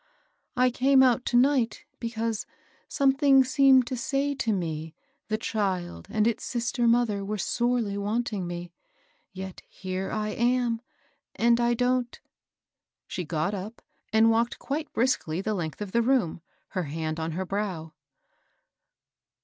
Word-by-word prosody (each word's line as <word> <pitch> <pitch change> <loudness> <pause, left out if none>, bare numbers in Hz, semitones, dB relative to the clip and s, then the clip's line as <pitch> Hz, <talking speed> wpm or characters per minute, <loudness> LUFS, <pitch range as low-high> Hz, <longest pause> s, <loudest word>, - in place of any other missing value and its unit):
I 250 0 +4
came 265 +2 +4
out 250 -1 +3
to 240 - +2
night, 255 -2 +2
be 230 - -3
cause 225 -1 -3 0.4
something 275 -2 +4
seemed 265 -1 +5
to 255 - -3
say 275 +4 -1
to 235 -5 -1
me 160 -4 -3 0.3
the 215 - 0
child 185 - -2
and 215 -1 +1
its 230 -1 0
sister 240 0 -1
mother 230 -4 +2
were 210 +2 -3
sorely 235 -1 0
wanting 210 -2 -2
me; 175 0 -6 0.6
yet 190 -1 -8
here 185 0 -4
I 215 0 -2
am, 235 0 +1 0.5
and 235 +1 +3
I 240 0 +2
don't 250 0 0 0.3
" - - -65
— - - -65
She 180 - -4
got 160 +4 -1
up 205 +4 -6 0.3
and 220 +1 +5
walked 230 +1 +1
quite 300 +2 -4
briskly 225 -9 0
the 215 +3 -1
length 170 -2 -4
of 200 - -8
the 235 - +3
room, 235 -10 +1 0.3
her 185 -2 -2
hand 155 +2 -3
on 160 0 -3
her 185 +3 -3
brow. 185 -5 -3
225 Hz, 150 wpm, -27 LUFS, 190-245 Hz, 0.6 s, seemed